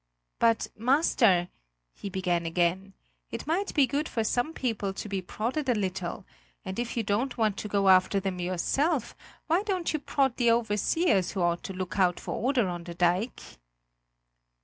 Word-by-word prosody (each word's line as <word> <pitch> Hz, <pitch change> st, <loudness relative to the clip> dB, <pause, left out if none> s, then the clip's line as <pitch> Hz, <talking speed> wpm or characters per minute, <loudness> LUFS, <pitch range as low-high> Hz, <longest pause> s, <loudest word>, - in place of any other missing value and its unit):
"But, 230 Hz, -1 st, +3 dB
master," 230 Hz, -, +3 dB, 0.4 s
he 200 Hz, -, -7 dB
began 180 Hz, -3 st, -1 dB
again, 180 Hz, +3 st, 0 dB, 0.3 s
"it -, -, -6 dB
might 355 Hz, +6 st, 0 dB
be 285 Hz, -3 st, +5 dB
good 285 Hz, +5 st, -2 dB
for 225 Hz, -, -1 dB
some 245 Hz, +7 st, 0 dB
people 225 Hz, -9 st, -2 dB
to -, -, -5 dB
be 195 Hz, -2 st, -2 dB
prodded 245 Hz, -, -3 dB
a 245 Hz, -, +3 dB
little, 190 Hz, -3 st, -3 dB, 0.4 s
and 190 Hz, -, -4 dB
if 240 Hz, 0 st, -3 dB
you 230 Hz, -, +1 dB
don't 235 Hz, +6 st, -1 dB
want 215 Hz, -3 st, +1 dB
to -, -, -4 dB
go 200 Hz, -1 st, +1 dB
after 185 Hz, +1 st, +5 dB
them 190 Hz, -2 st, -3 dB
yourself, 235 Hz, -, 0 dB, 0.3 s
why 335 Hz, +4 st, +2 dB
don't 380 Hz, -6 st, -1 dB
you 310 Hz, -, 0 dB
prod 270 Hz, -3 st, 0 dB
the 240 Hz, -2 st, +3 dB
overseers 230 Hz, -, +2 dB
who 190 Hz, -, -1 dB
ought 170 Hz, 0 st, +1 dB
to 190 Hz, -, -5 dB
look 185 Hz, +1 st, -4 dB
out 180 Hz, -2 st, +3 dB
for -, -, -5 dB
order 250 Hz, -3 st, +1 dB
on 175 Hz, -1 st, -5 dB
the 170 Hz, -1 st, -7 dB
dike?" 180 Hz, +7 st, 0 dB
210 Hz, 175 wpm, -28 LUFS, 185-260 Hz, 0.4 s, be